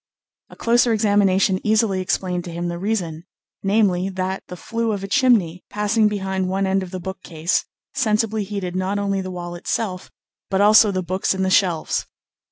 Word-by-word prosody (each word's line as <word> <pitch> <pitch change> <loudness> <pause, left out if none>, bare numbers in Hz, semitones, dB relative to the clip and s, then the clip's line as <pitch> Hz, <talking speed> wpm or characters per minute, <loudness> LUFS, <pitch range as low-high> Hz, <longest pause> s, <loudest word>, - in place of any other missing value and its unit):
A - - -13
closer 235 0 +3
examination 200 -3 +3
easily 215 -3 +2
explained 180 -1 -1
to 175 - -6
him 175 +1 -3
the 170 0 -4
reason 180 -6 -2 0.4
namely, 195 -2 +2
that 190 0 -3
the 180 - -8
flue 230 +3 -2
of 200 -1 -4
a - - -4
chimney, 200 -7 +2
passing 210 +1 +2
behind 190 -2 -2
one 195 +1 0
end 190 0 +1
of 185 - -6
the 185 - -5
bookcase, 175 -2 -2 0.3
sensibly 220 -4 +1
heated 195 -3 -4
not 185 +2 -1
only 200 -1 -1
the 185 - -6
wall 175 -1 -6
itself, 185 +2 -3 0.4
but 195 - 0
also 210 +1 +7
the 185 -2 -1
books 185 +2 -1
in 190 - -1
the 190 - 0
shelves. 175 -5 +1
190 Hz, 175 wpm, -21 LUFS, 185-210 Hz, 0.4 s, also